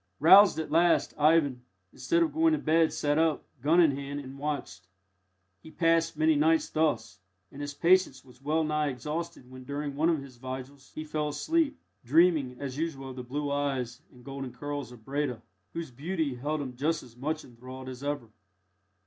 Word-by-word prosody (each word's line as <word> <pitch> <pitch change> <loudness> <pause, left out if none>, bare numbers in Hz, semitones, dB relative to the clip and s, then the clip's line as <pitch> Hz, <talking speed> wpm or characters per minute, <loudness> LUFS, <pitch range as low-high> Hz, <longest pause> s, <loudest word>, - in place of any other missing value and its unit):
Roused 190 +6 +8
at 160 - -4
last, 170 +1 +3
Ivan, 150 -4 +3 0.3
instead 340 0 +1
of 325 - -2
going 325 +1 +3
to - - +2
bed, 160 - +2
sat 145 +1 0
up, 160 -2 +1 0.2
gun 160 +6 +4
in 165 -4 +6
hand, 140 +1 -5
and 135 0 -10
watched. 140 -11 -4 0.7
He - - -12
passed 165 0 +1
many 155 +1 +4
nights 160 +2 +3
thus, 115 -11 0 0.3
and 140 - -9
his 145 0 -5
patience 170 -7 +3
was 125 0 -18
well 155 +3 +1
nigh 150 -1 0
exhausted 150 +2 -5
when, 130 0 -10
during 140 +1 -4
one 160 +4 +2
of 165 -3 +2
the 140 - -9
vigils, 130 +2 -9
he 155 - -4
fell 155 -1 -2
asleep, 310 - 0 0.3
dreaming 145 -2 +3
as 140 0 -5
usual 135 -5 -3
of - - -10
the 130 - -5
blue 145 +3 -3
eyes 135 -3 -2
and 125 -1 -18
golden 135 -2 -6
curls 145 -3 -5
of 115 -3 -15
Breda, 140 -3 -2 0.3
whose 165 -5 -5
beauty 155 +2 -2
held 145 +5 -3
him 130 -3 -6
just 155 +5 -1
as 120 -2 -16
much 155 +5 -3
enthralled 130 +2 -10
as 130 +1 -8
ever. 140 -6 -3
145 Hz, 185 wpm, -29 LUFS, 130-160 Hz, 0.7 s, Roused